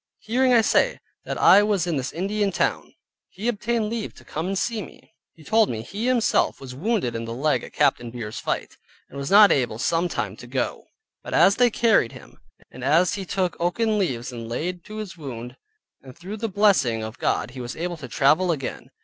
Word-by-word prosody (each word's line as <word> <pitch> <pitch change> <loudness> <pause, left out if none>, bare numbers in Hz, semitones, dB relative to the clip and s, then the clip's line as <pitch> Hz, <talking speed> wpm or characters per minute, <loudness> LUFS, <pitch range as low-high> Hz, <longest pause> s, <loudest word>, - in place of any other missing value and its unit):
Hearing, 255 +3 +1
I 235 -2 +6
say, - - +2 0.3
that - - -4
I 200 - +7
was 205 -4 +1
in 170 -3 -1
this 130 -1 -2
Indian 200 +3 -1
town, - - -1 0.3
he 210 +5 -6
obtained 230 -1 0
leave 230 -2 -4
to - - -16
come 160 +3 -4
and 195 0 -2
see 225 +2 -1
me. - - -13 0.2
He 160 - -16
told 220 +7 +3
me 110 -1 -4
he 210 - -4
himself 250 -3 +2
was 130 -2 -9
wounded 175 - -1
in 115 0 -3
the 115 0 -5
leg 135 -1 +1
at - - -9
Captain 120 -1 +1
Beer's 115 -2 -6
fight; - - -3 0.3
and 140 - -8
was 140 - -4
not 205 +1 +8
able 120 -5 +1
some 165 +8 0
time - - -3
to - - -11
go, - - -3 0.4
but - - -5
as 200 - +5
they 245 -1 +5
carried 220 - +2
him, - - -14 0.3
and 125 - -10
as 165 - +3
he 200 -3 -4
took 185 -1 -1
oaken 210 +5 +1
leaves 130 -9 -2
and 115 -2 -7
laid 175 +8 -3
to 215 - -9
his 210 -5 -6
wound, 125 -5 -7 0.5
and 130 -2 -13
through 190 +5 -7
the 225 +1 -3
blessing 180 - +2
of 110 +2 -7
God - - 0
he 130 -1 -8
was 120 0 -6
able 175 +1 -4
to 140 - -8
travel 155 +8 +3
again. 140 -5 -5
175 Hz, 215 wpm, -24 LUFS, 130-210 Hz, 0.5 s, not